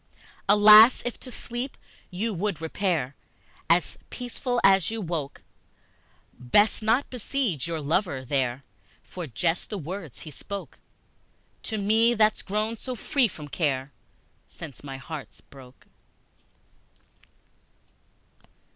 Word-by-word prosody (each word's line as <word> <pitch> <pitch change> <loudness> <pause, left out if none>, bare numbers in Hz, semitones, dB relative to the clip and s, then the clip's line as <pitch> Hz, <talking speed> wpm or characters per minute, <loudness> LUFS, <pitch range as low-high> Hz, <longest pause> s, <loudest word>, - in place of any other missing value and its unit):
Lass, 210 +3 +8
if 245 - -4
to 255 - -10
sleep 245 +2 -5 0.3
you 210 +5 -2
would 195 -2 -2
repair 160 -5 -1 0.6
As - - +2
peaceful 245 0 -3
as 195 -2 +5
you 225 0 -4
woke, 165 -7 -4 0.9
Best 205 - +2
not 225 +6 +2
beseige 240 - -2
your 165 -1 -3
lover 145 -3 -1
there 130 0 -1 0.4
For 175 -3 -7
just 165 +7 -1
the 210 - -4
words 170 -3 -7
he 155 - -9
spoke 200 +7 -8 0.8
To 220 - -4
me, 220 +4 +3
that's 215 -1 +3
grown 215 +3 -2
so 255 +3 -5
free 255 +2 +1
from 155 -7 -10
care 140 -3 -1 0.6
Since 145 -5 -11
my 135 -2 -6
heart 150 +2 -8
broke! 130 -2 -15
190 Hz, 115 wpm, -26 LUFS, 145-220 Hz, 0.9 s, Lass